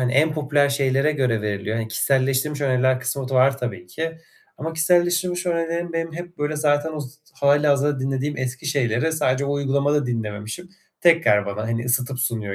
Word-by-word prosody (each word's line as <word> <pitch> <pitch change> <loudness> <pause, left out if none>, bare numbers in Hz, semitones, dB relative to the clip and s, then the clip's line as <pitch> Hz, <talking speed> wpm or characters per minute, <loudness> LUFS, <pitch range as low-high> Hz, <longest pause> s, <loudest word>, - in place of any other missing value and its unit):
hani 125 -1 0
en 155 +4 +3
popüler 145 -1 +2
şeylere 140 +2 +1
göre 125 -6 0
veriliyor, 105 +1 -2
hani 115 -1 -3
kişiselleştirilmiş 135 +5 +1
öneriler 130 -1 +2
kısmı 130 0 -3
da 135 - -3
var 135 +1 +4
tabii 95 -9 -5
ki. 165 - -5 0.4
Ama 165 - -4
kişiselleştirilmiş 175 +2 +1
önerilerim 170 0 -1
benim 165 -1 -3
hep, 175 +1 -8
böyle, 150 +1 -1
zaten 150 +1 +1
o 155 - -4
z 135 -1 -8 0.3
hâlihazırda 145 0 +3
dinlediğim 135 +2 -2
eski 130 +3 -4
şeyleri 140 +2 0
sadece 135 -3 +1
o 140 - -1
uygulamada 140 0 +1
dinlememişim. 110 +8 -4 0.3
Tekrar 165 - +4
bana 100 +2 -4
hani 115 0 -2
ısıtıp 125 +1 0
sunuyor 110 -5 -2
140 Hz, 170 wpm, -22 LUFS, 125-155 Hz, 0.4 s, var